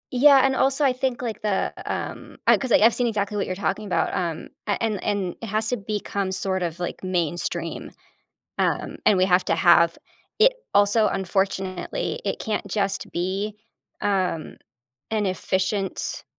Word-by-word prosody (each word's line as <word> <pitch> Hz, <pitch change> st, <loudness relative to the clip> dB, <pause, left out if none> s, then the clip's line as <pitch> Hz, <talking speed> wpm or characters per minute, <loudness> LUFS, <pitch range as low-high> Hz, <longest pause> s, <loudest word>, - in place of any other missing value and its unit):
Yeah, 275 Hz, +1 st, +7 dB
and 265 Hz, 0 st, +2 dB
also, 270 Hz, +2 st, +2 dB
I 260 Hz, -, +4 dB
think, 255 Hz, -1 st, -2 dB
like, 230 Hz, -3 st, -4 dB
the, 210 Hz, -2 st, 0 dB, 0.2 s
um, -, -, -5 dB
I -, -, +7 dB
'cause 260 Hz, -3 st, -4 dB
I've 225 Hz, +1 st, +6 dB
seen 245 Hz, -, 0 dB
exactly 210 Hz, -2 st, -1 dB
what 200 Hz, -, -1 dB
you're 185 Hz, -, -2 dB
talking 200 Hz, +2 st, -2 dB
about, 185 Hz, -, 0 dB
um, 170 Hz, -3 st, -3 dB, 0.2 s
and 205 Hz, -, +1 dB
and 215 Hz, -4 st, -1 dB
and 195 Hz, -4 st, -1 dB
it 230 Hz, -, -5 dB
has 215 Hz, +2 st, 0 dB
to 250 Hz, -, 0 dB
become 200 Hz, -2 st, -3 dB
sort 190 Hz, 0 st, -1 dB
of, 170 Hz, -1 st, -3 dB
like, 175 Hz, -, -4 dB
mainstream, 170 Hz, -1 st, -2 dB, 0.7 s
um, -, -, -1 dB
and 200 Hz, -, +5 dB
we 185 Hz, -, +5 dB
have 180 Hz, -1 st, +3 dB
to 165 Hz, -, +2 dB
have 170 Hz, 0 st, +5 dB, 0.4 s
it -, -, +6 dB, 0.2 s
also, 205 Hz, +2 st, +4 dB
unfortunately, 190 Hz, -, -2 dB
it -, -, -2 dB
can't 215 Hz, -1 st, -2 dB
just 195 Hz, 0 st, -2 dB
be, 195 Hz, +4 st, -2 dB, 0.4 s
um, 185 Hz, -5 st, -1 dB, 0.5 s
an 215 Hz, -1 st, +1 dB
efficient, 190 Hz, +1 st, -2 dB
200 Hz, 165 wpm, -24 LUFS, 185-220 Hz, 0.7 s, Yeah